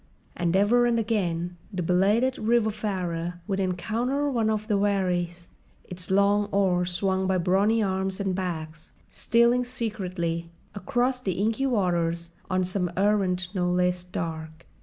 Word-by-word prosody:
And 175 0 0
ever 235 +5 +4
and 235 -1 +2
again 180 -6 -1
the 180 -3 -3
belated 205 +9 +2
riverfarer 205 -7 -1
would 195 0 -2
encounter 235 +10 -1
one 230 -4 +1
of 215 0 -1
the 210 - +1
wherries, 180 -4 -1 0.3
its 180 0 -7
long 200 +2 +3
oars 185 -3 +1
swung 190 +1 0
by 190 -1 +2
brawny 200 +5 +2
arms 190 0 -1
and 195 -2 -1
backs, 160 -4 -5 0.2
stealing 235 +2 +3
secretly 185 -9 -3 0.2
across 245 +6 0
the 190 -7 -1
inky 220 +8 0
waters 170 -7 0 0.2
on 185 -1 +1
some 180 0 -1
errand 190 -3 +1
no 180 -2 0
less 180 0 +1
dark. 160 -2 -6
190 Hz, 140 wpm, -26 LUFS, 180-215 Hz, 0.3 s, ever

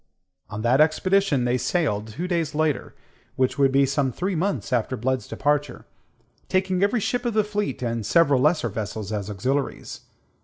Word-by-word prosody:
On 110 0 -5
that 125 +5 +4
expedition 160 -3 +2
they 125 +1 +1
sailed 110 - 0
two 140 +12 -5
days 165 -5 -1
later 155 -3 -1 0.4
which 130 +1 0
would 135 -1 +4
be 135 +1 +4
some 135 0 0
three 185 - -2
months 180 -4 -2
after 125 +1 0
Blood's 130 +2 -1
departure 145 -2 -1 0.6
taking 185 -1 +1
every 205 +4 +2
ship 245 +4 -1
of 240 -3 -2
the 215 - +4
fleet, 210 -10 -3
and 115 -2 -2
several 140 +4 +3
lesser 150 -4 +2
vessels 105 0 -5
as 105 -1 -3
auxiliaries. 130 +8 -3
140 Hz, 165 wpm, -24 LUFS, 120-180 Hz, 0.6 s, that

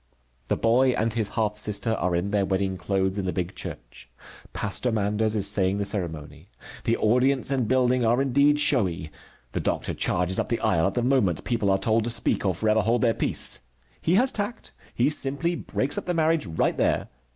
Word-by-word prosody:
The - - 0
boy 125 +3 +3
and 110 0 0
his 110 -3 -1
half 105 -1 0
sister 105 +1 +1
are 90 -5 -1
in 90 +4 -1
their 100 -1 +1
wedding 95 0 -1
clothes 95 +2 -1
in 95 - -3
the - - 0
big 90 0 -3
church. - - -9 0.4
Pastor 105 +4 -3
Manders 105 0 0
is 100 -2 0
saying 95 0 +2
the 100 - -1
ceremony. 80 -4 -4 0.4
The 115 0 +1
audience 125 +4 +2
and 130 -5 0
building 125 0 +2
are 120 +2 +2
indeed 140 +2 +3
showy. 95 - 0 0.4
The - - -3
doctor - - -2
charges 90 +1 0
up - - -2
the 115 - 0
aisle 85 -7 +2
at - - -3
the 120 - 0
moment 125 -10 +1
people 115 -5 -1
are 95 - +3
told 110 +2 +1
to - - -2
speak 115 0 0
or 95 - 0
forever 110 +4 +2
hold 115 +3 +1
their 115 -2 +3
peace. - - +1 0.4
He 170 - +2
has 255 +6 +4
tact. 210 +3 -4 0.2
He 120 - +2
simply 145 +4 0
breaks 145 -4 -1
up - - -11
the 180 - -1
marriage 160 -1 +1
right 80 - 0
there. - - 0
110 Hz, 200 wpm, -25 LUFS, 95-130 Hz, 0.4 s, has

